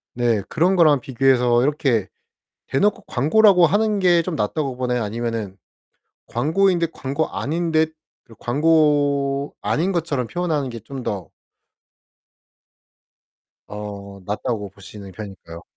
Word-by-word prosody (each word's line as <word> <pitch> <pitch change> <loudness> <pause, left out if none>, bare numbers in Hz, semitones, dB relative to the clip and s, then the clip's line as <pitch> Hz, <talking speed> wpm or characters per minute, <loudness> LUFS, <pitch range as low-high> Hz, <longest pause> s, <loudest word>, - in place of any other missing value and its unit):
네 120 -4 +1
그런 175 +4 +2
거랑 155 -6 +5
비교해서 125 -2 +2
이렇게 135 - +1 0.6
대놓고 205 +10 +1
광고라고 180 - +4
하는 210 +3 +1
게 175 -3 +4
좀 165 0 -4
낫다고 135 +3 -2
보나요? 125 -2 -1
아니면은 110 -2 -4 0.7
광고인 175 +9 +2
듯 170 -1 -1
광고 140 +4 -2
아닌듯 160 0 -1 0.3
그런 115 -3 -18
광고 145 -1 +2
아닌 175 +6 0
것처럼 155 -8 -1
표현하는 160 -5 -2
게 115 -1 -7
좀 135 +5 -8
더 100 -7 -4 2.4
어 100 -1 -8
낫다고 105 0 -3
보시는 100 0 -12
편인가요? 95 -5 -10
135 Hz, 265 characters per minute, -21 LUFS, 115-160 Hz, 2.4 s, 거랑